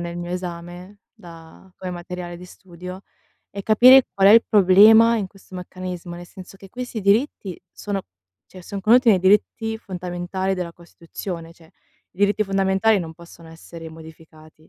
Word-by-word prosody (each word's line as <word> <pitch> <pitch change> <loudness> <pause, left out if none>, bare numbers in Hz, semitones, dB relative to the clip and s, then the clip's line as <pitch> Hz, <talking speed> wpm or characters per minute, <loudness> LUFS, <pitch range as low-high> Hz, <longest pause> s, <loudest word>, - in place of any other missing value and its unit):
nel 170 0 -6
mio 175 0 -6
esame, 180 +2 -8 0.2
da 165 +2 -16
come 185 -1 -7
materiale 175 0 -8
di 180 - -12
studio, 180 0 -11 0.5
è 200 - -7
capire 250 +4 +6
qual 195 0 +4
è - - +7
il 230 +1 +6
problema 215 +3 +6
in 205 -3 -3
questo 190 -1 -15
meccanismo, 180 -1 -8
nel 175 0 -10
senso 185 +2 -13
che 195 0 -15
questi 245 0 -7
diritti 200 - 0
sono 200 -2 -5 0.4
cioè, 185 -1 -14
son 200 +2 -7
contenuti 235 +4 +4
nei 195 -4 +5
diritti 210 +4 +1
fondamentali 180 0 -4
della 180 -2 -5
Costituzione; 170 0 -9
cioè, 165 -1 -21 0.5
i - - -26
diritti 205 +1 +1
fondamentali 195 +2 +1
non 160 -2 -7
possono 170 0 -16
essere 165 0 -12
modificati. 160 -1 -15
185 Hz, 160 wpm, -21 LUFS, 175-200 Hz, 0.5 s, è